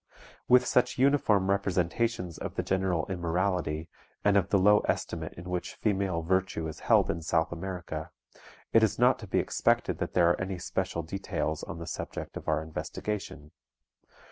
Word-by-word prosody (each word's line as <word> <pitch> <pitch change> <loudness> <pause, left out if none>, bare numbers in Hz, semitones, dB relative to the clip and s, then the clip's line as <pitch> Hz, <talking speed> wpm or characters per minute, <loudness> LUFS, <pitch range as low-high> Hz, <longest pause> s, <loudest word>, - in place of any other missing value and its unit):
With 125 0 +6
such 125 - +2
uniform 120 -8 +3
representations 95 0 0
of - - -5
the - - -1
general 95 -3 0
immorality, 85 -3 -1 0.4
and 100 -1 +4
of 100 -2 +3
the 100 - +4
low 105 +2 +6
estimate 80 -1 -2
in 90 +1 -10
which 90 -1 -3
female 95 -5 0
virtue 95 -2 0
is 80 - -7
held - - +3
in 85 - -4
South 80 0 +1
America, 85 -3 -5 0.6
it 115 - +7
is 110 -3 +2
not 125 +2 +4
to 105 - -9
be - - 0
expected - - +1
that - - -3
there 85 -2 +5
are - - -1
any 95 0 -3
special 90 -1 -2
details 80 -3 -3
on - - -6
the 85 - -6
subject - - -6
of - - -7
our 80 - +1
investigation. 80 -1 -5
95 Hz, 170 wpm, -29 LUFS, 85-100 Hz, 0.6 s, it